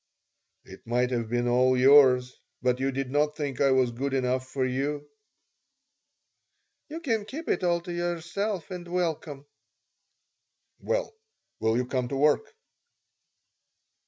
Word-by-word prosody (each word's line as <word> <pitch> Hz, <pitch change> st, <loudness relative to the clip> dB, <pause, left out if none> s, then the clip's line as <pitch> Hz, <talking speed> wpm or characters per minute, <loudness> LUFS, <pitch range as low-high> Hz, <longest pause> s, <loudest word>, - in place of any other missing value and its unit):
"It -, -, -14 dB
might 125 Hz, +2 st, +1 dB
have 115 Hz, -3 st, -2 dB
been 120 Hz, +1 st, 0 dB
all 130 Hz, +1 st, +3 dB
yours. 130 Hz, -1 st, +5 dB, 0.3 s
But 125 Hz, 0 st, +1 dB
you 135 Hz, +1 st, 0 dB
did 135 Hz, -1 st, -4 dB
not 150 Hz, +1 st, +1 dB
think 140 Hz, -4 st, -3 dB
I 140 Hz, -, +4 dB
was 130 Hz, -2 st, +3 dB
good 135 Hz, +3 st, -3 dB
enough 130 Hz, 0 st, 0 dB
for 130 Hz, 0 st, -1 dB
you." 145 Hz, +3 st, -2 dB, 1.8 s
"You 320 Hz, +2 st, -6 dB
can 225 Hz, -9 st, 0 dB
keep 300 Hz, +10 st, -8 dB
it -, -, 0 dB
all 170 Hz, -1 st, +1 dB
to 175 Hz, 0 st, -7 dB
yourself 175 Hz, +2 st, -3 dB
and 180 Hz, -1 st, -7 dB
welcome." 165 Hz, -5 st, -3 dB, 1.3 s
"Well, -, -, -2 dB, 0.5 s
will 110 Hz, +1 st, +1 dB
you 125 Hz, -, 0 dB
come 125 Hz, -1 st, -2 dB
to 135 Hz, -, -4 dB
work?" 150 Hz, -, +2 dB
140 Hz, 135 wpm, -27 LUFS, 125-175 Hz, 1.8 s, yours